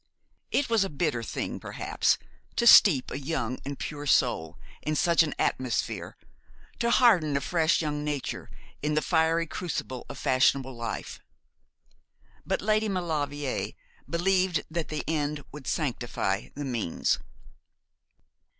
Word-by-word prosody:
It 285 - +1
was 225 -3 +3
a 195 - -3
bitter 145 -5 -1
thing, 115 - -4
perhaps, - - 0 0.4
to 235 - +1
steep 165 - +7
a - - -3
young 135 -4 -2
and 140 0 -5
pure 145 -1 -5
soul 80 - +2 0.2
in 155 - -1
such 170 +2 +4
an 155 -2 0
atmosphere, 130 -2 -1 0.6
to 235 - +1
harden 190 - +4
a - - +1
fresh 160 +2 +2
young 150 -1 -2
nature 150 -3 -3 0.3
in 150 +1 0
the 155 - +2
fiery 165 0 +2
crucible 150 -7 -5
of - - -7
fashionable 130 -1 +2
life; 115 -2 -5 1.3
but - - -1
Lady 215 +1 +2
Maulevrier 145 -7 -2 0.4
believed 180 -1 +2
that 165 -1 -2
the 155 -1 -3
end 150 -2 -1
would 145 -2 -10
sanctify 120 - -1
the 145 - -4
means. 115 -10 0
150 Hz, 130 wpm, -28 LUFS, 135-170 Hz, 1.3 s, steep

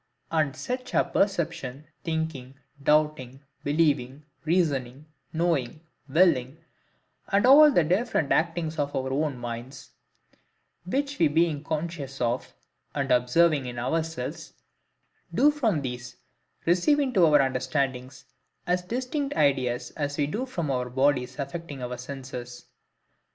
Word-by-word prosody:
And 155 -4 +1
such 250 0 -5
are - - +5
perception, 160 -8 -1 0.2
thinking, 160 -6 -3 0.3
doubting, 150 -3 +1 0.2
believing, 145 -3 +1 0.2
reasoning, 145 -6 0 0.3
knowing, 160 -5 -1 0.3
willing, 150 -4 +3 0.7
and 200 +3 +2
all 295 +4 +9
the 175 - +3
different 180 - 0
actings 165 -1 0
of 145 0 -1
our 130 0 -2
own 145 -1 -1
minds;—which 135 - -7
we 165 - +5
being 155 -1 +1
conscious 155 -3 -4
of, 120 +1 -1 0.4
and 140 -2 -1
observing 135 +3 +3
in 120 0 -6
ourselves, 160 +3 -3 0.8
do 295 - +4
from 225 - 0
these 125 -1 -6 0.5
receive 180 - +3
into 255 -10 +2
our 150 -1 +5
understandings 130 -1 -1 0.4
as 180 0 +1
distinct 260 - -3
ideas 130 -4 +1
as 145 -1 -3
we 145 - +2
do 220 - -3
from 170 -11 -3 0.3
bodies 130 -2 +1
affecting 140 -1 -6
our 125 0 -5
senses. 125 -2 -8
150 Hz, 115 wpm, -26 LUFS, 130-170 Hz, 0.8 s, all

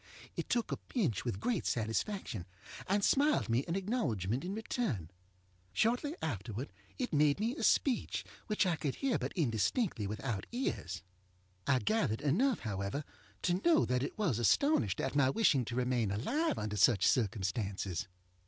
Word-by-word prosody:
It - - -4
took 235 -2 0
a - - -1
pinch 165 - -1
with 115 -6 -2
great 230 - 0
satisfaction, 110 - -2 0.4
and 200 +1 +2
smiled 290 - +3
me 120 +4 +2
an 170 - -1
acknowledgement 135 - -1
in 190 +3 -3
return. 190 - -2 0.6
Shortly 245 - +1
afterward 115 - -4 0.2
it 250 - -3
made 150 +1 +4
me 230 +5 0
a - - -6
speech, 265 -4 +2 0.2
which 210 -2 +2
I 175 -3 +1
could 140 -3 -2
hear 270 -3 0
but - - -3
indistinctly 125 - 0
without 105 -1 -3
ears. 235 - -3 0.6
I 130 - +4
gathered 215 - 0
enough, 210 - +2
however, 100 +6 -3 0.4
to 180 +1 +1
know 335 -2 +5
that 125 0 +1
it 140 - -4
was 170 - +1
astonished 120 - +3
at - - -2
my 140 -2 +4
wishing 140 - +3
to 115 - -5
remain 125 -3 +1
alive 280 - 0
under 105 0 -3
such 100 0 +5
circumstances. 100 -3 0
140 Hz, 155 wpm, -33 LUFS, -, 0.6 s, know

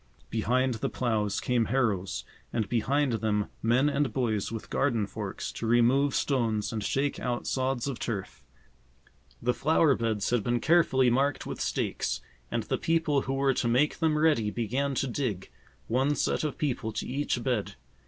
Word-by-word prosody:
Behind 125 +4 +1
the 110 - -2
plows 110 -5 0
came 120 -2 +1
harrows, 105 -7 0 0.3
and 110 -4 -1
behind 135 +4 +1
them 105 -2 0
men 120 +5 +3
and 140 -3 +1
boys 110 -4 -1
with 115 -1 -7
garden 120 -7 +1
forks, - - -5
to 115 - -4
remove 125 +4 +3
stones 115 -6 0
and 110 -2 -2
shake 140 +6 0
out 120 -1 -2
sods 130 -1 -1
of 135 -4 -4
turf. 105 -5 -4 1.0
The 125 +1 +2
flower 155 +1 +3
beds 115 -4 -1
had 120 -4 +2
been 120 +2 +1
carefully 135 -5 +4
marked 140 +3 +1
with - - -5
stakes, - - -1 0.3
and - - -1
the - - -2
people 160 -4 +1
who 135 - -2
were 135 0 +2
to 120 - 0
make 130 +6 +2
them 160 -2 +2
ready 150 -9 +3
began 130 +6 -1
to 135 - 0
dig, 120 -7 -3 0.4
one 135 +5 +1
set - - 0
of 150 - -2
people 130 -7 -1
to - - -3
each 130 -2 -1
bed. 120 - -1
125 Hz, 170 wpm, -28 LUFS, 115-140 Hz, 1.0 s, carefully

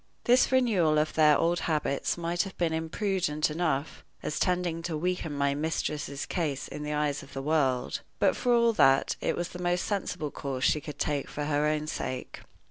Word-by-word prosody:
This 250 +2 +4
renewal 205 -12 +3
of 155 +1 +1
their 150 -2 +5
old 170 +1 +1
habits 150 -2 -1
might 170 +1 0
have 195 -2 -6
been 170 -2 +1
imprudent 160 -2 -1
enough, 155 -3 -2 0.2
as 150 - -2
tending 180 -2 0
to 165 -2 -3
weaken 180 -1 -2
my 140 -1 +1
mistress's 150 -1 -2
case 155 -7 -2
in - - -7
the 150 0 -3
eyes 150 -1 0
of 140 - -14
the 135 - -4
world, 135 -4 +1 0.2
but, - - +3
for 245 - 0
all 235 -1 +4
that, 135 -10 +4
it - - 0
was 175 0 -3
the 180 - -8
most 175 0 0
sensible 180 -7 -2
course 135 -2 -4
she 150 - +3
could 145 0 -8
take 145 -1 -1
for 145 - -4
her 145 0 +1
own 155 0 0
sake. 130 -4 -5
155 Hz, 195 wpm, -28 LUFS, 145-175 Hz, 0.2 s, their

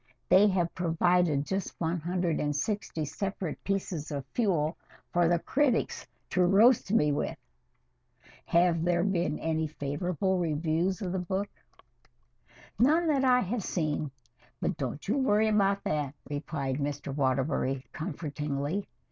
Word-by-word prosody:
"They 190 +3 +7
have 180 -4 0
provided 170 -3 +2
just 190 +2 -3
one 170 +1 0
hundred 175 0 -1
and 145 0 -1
sixty 165 -1 -2
separate 180 +2 -4
pieces 190 -6 -2
of 140 -3 -4
fuel 170 -9 +1 0.4
for 175 -1 +4
the 175 +1 +3
critics 265 - 0 0.2
to 185 - +3
roast 200 +4 +5
me 150 -9 +3
with. 145 - -2 1.1
Have 170 -1 +3
there 175 0 +2
been 175 -5 0
any 160 0 -1
favorable 175 +6 -1
reviews 170 +4 0
of 180 - -2
the 190 - -1
book?" 190 +3 -2 1.3
"None 310 +8 +4
that 275 -3 +2
I 250 -1 +5
have 225 +2 -2
seen 155 -5 -1 0.5
but 180 - -1
don't 140 +2 -5
you 240 +8 +1
worry 220 -4 +3
about 200 -2 +2
that," 150 -2 -2
replied 145 -2 -3
Mr. 145 -1 -3
Waterbury 135 -1 0
comfortingly. 150 +1 -3
175 Hz, 135 wpm, -29 LUFS, 150-195 Hz, 1.3 s, They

